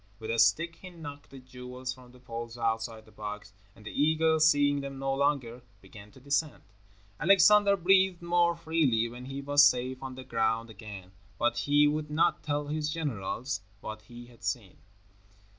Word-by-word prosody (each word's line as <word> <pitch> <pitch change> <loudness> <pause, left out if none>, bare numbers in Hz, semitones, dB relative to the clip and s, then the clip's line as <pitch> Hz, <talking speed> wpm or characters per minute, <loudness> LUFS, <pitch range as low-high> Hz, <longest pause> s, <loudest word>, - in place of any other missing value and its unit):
With 110 +1 -5
a 115 - -1
stick 165 +6 +3
he 185 - -10
knocked 145 -5 -10
the 135 - -12
jewels 125 0 -7
from 125 -1 -16
the 125 - -17
poles 115 -1 -7
outside 115 -1 -2
the 110 - -19
box, 105 -1 -7 0.2
and 105 - -17
the - - -6
eagles, 160 +1 +3
seeing 145 -1 +3
them 140 -1 -7
no 135 0 -1
longer, 135 -4 0 0.2
began 100 +2 -14
to - - -15
descend. 140 +3 -1 0.6
Alexander 200 +4 +5
breathed 190 -1 +3
more 170 0 +2
freely 160 -9 +1
when 120 +2 -9
he 135 +1 -6
was 145 +1 +5
safe 130 -2 +2
on 130 -1 -6
the 130 - -8
ground 115 -1 -1
again, 100 -4 -10 0.3
but 150 - +1
he 145 +1 +3
would 150 0 -2
not 150 +2 +1
tell 145 -1 -2
his 150 +1 -2
generals 130 -5 -3 0.2
what 110 +1 -7
he 120 +2 -12
had 120 -1 -19
seen. 105 -7 -4
135 Hz, 175 wpm, -29 LUFS, 115-155 Hz, 0.6 s, Alexander